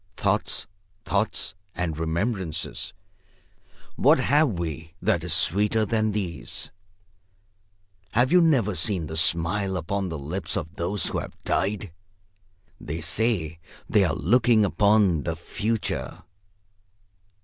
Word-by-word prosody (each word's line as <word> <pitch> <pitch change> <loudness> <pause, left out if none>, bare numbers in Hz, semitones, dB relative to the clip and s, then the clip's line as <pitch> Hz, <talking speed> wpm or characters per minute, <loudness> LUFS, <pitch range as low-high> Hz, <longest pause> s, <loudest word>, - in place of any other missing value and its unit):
Thoughts, 100 +1 0 0.4
thoughts 100 -1 -1 0.2
and 85 -3 -2
remembrances, 85 +1 -2 1.1
what - - +5
have 150 +3 +3
we 80 -1 -5
that - - +1
is - - -4
sweeter 105 +5 +3
than 110 -1 +1
these? 90 - -3 1.4
Have 125 +3 +3
you 180 0 +6
never 130 - +3
seen 90 0 +1
the 80 - -6
smile 85 +4 +2
upon 95 +3 -2
the 80 - -4
lips 80 +6 -4
of 80 +2 -5
those 95 +5 0
who - - 0
have - - -8
died? 100 -1 -1 0.9
They 80 +3 -5
say 85 -1 0 0.3
they 105 - +4
are 80 -3 +1
looking 115 +1 +4
upon 100 -4 +3
the 85 +2 -2
Future. 105 +6 -3
95 Hz, 115 wpm, -25 LUFS, 80-110 Hz, 1.4 s, you